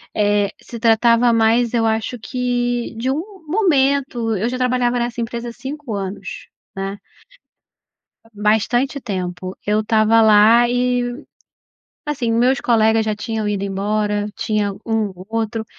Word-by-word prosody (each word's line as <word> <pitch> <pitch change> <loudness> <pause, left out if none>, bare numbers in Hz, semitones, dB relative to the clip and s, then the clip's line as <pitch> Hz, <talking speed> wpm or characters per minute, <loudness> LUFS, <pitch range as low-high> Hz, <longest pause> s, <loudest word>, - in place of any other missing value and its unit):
Eh, 205 -1 +2
se 235 - -9
tratava 230 +1 +4
mais 230 +1 +2
eu 230 -1 +2
acho 225 +2 -1
que, 245 -1 -2
de 255 +3 -1
um 300 +4 -1 0.3
momento, 275 - +1
eu 215 - -1
já 255 - -3
trabalhava 250 -1 +1
nessa 240 0 -3
empresa 235 +1 -4
há - - -7
5 265 -1 -7
anos, 195 0 -6 0.3
né. 195 +1 -4 1.4
Bastante 220 +7 +1
tempo, 185 -4 -5
eu 210 +1 +2
estava 220 +1 +3
lá 220 +3 +6
e, 245 0 +1 1.0
assim, 260 -6 -1
os 230 - +2
meus 255 +2 +3
colegas 220 -1 +3
já 215 -1 -1
tinham 220 0 -3
ido 205 -1 -1
embora, 205 +1 -1
tinha 210 -2 -1
um 220 -3 0
ou 185 - -11
outro, 225 0 -2
225 Hz, 140 wpm, -19 LUFS, 210-245 Hz, 1.4 s, lá